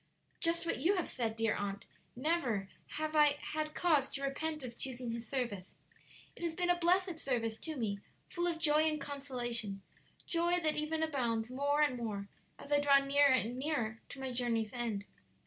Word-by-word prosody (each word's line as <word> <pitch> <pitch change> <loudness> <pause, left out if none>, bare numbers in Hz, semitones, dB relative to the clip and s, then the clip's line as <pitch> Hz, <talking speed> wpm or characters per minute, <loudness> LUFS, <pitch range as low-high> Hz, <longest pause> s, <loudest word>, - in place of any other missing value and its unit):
"Just 335 0 +2
what 330 - -1
you 380 +5 +3
have 360 - -1
said, 225 -3 -2
dear 225 -1 +1
aunt; 200 0 -4 0.3
never 245 - 0 0.3
have 310 0 -2
I 295 -1 +6
had 305 0 -3
cause 305 -6 +3
to 275 - -4
repent 305 +2 -2
of 240 -2 -6
choosing 250 -1 -3
His 230 0 -5
service; 235 -9 -3 0.6
it - - -13
has 335 -2 -2
been 355 0 +2
a - - +4
blessed 355 0 +2
service 230 -6 -1
to 315 +4 -5
me, 210 -6 -2 0.3
full 345 0 -1
of 335 -2 0
joy 310 -1 +4
and 305 -1 -2
consolation 240 -8 -2 0.4
joy 345 +1 +2
that 310 -2 +1
even 315 +1 -1
abounds 240 -6 -1
more 285 +3 +2
and 270 -4 +1
more 205 -4 -4 0.3
as 285 - -11
I 290 - +5
draw 285 -1 +6
nearer 280 +1 +4
and 245 0 +1
nearer 240 -7 -1
to 275 - -9
my 265 -1 -3
journey's 235 -3 0
end. 230 -5 -2
275 Hz, 185 wpm, -34 LUFS, 235-315 Hz, 0.6 s, I